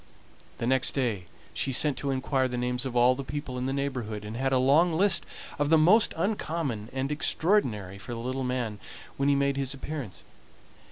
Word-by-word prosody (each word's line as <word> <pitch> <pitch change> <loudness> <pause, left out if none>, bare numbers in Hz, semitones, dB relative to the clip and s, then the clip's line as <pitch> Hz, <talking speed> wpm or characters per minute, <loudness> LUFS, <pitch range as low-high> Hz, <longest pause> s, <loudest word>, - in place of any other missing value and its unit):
The - - -3
next 130 +1 +2
day 115 -9 -1 0.3
she 135 - -2
sent 145 +2 +2
to 140 - -3
inquire 130 0 +1
the 125 -1 -4
names 125 +1 -1
of 125 - -6
all 120 +1 +5
the 135 +2 -5
people 140 -1 -5
in 125 - -2
the - - -1
neighborhood, 125 -7 -3
and 105 +2 -6
had 135 +2 0
a 130 - +4
long 150 +7 +4
list 190 +1 +2 0.3
of 145 0 +1
the 160 - +6
most 185 +8 +5
uncommon 160 - -2
and 135 +2 -2
extraordinary 130 - +1
for 120 +4 -7
the - - -5
little 130 +3 -3
man 125 -4 -2 0.4
when 140 +1 +2
he 140 - +4
made 140 0 +1
his 135 0 -2
appearance. 140 -7 -6
130 Hz, 200 wpm, -28 LUFS, 125-145 Hz, 0.4 s, the